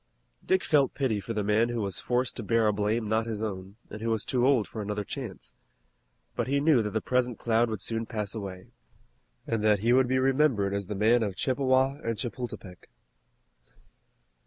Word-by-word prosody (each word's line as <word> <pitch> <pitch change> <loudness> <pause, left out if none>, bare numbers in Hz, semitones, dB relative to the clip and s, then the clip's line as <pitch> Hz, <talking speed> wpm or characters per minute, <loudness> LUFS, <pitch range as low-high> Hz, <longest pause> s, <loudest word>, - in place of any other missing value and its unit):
Dick 190 0 +2
felt 140 -4 +2
pity 125 -7 0
for 115 +3 -5
the 105 -1 -1
man 105 +3 +2
who 120 -1 -2
was 100 -3 -3
forced 125 0 0
to - - -5
bear 115 +2 +2
a 105 - +3
blame 105 +2 0
not 110 +1 0
his 110 -1 -3
own, 95 -2 -5 0.2
and 110 - -7
who 115 - -1
was 110 -2 0
too 125 -1 +1
old 130 -6 +3
for 110 - -6
another 105 0 -3
chance. - - -7 0.8
But - - -1
he 140 +2 +1
knew 145 -4 +4
that 105 - -2
the 110 +1 -2
present 125 -2 0
cloud 115 0 +1
would 110 -3 -4
soon 115 0 -2
pass 105 -4 -4
away, 95 -4 -7 0.7
and 115 -2 -1
that 105 -2 +3
he 115 +2 +3
would 130 0 +4
be 130 +1 +1
remembered 130 -7 +2
as 100 -2 -3
the 105 - -4
man 110 +4 +3
of 100 -4 -2
Chippewa 130 +2 +1
and 115 -1 -2
Chapultepec. 120 -7 -6
115 Hz, 200 wpm, -28 LUFS, 105-125 Hz, 0.8 s, knew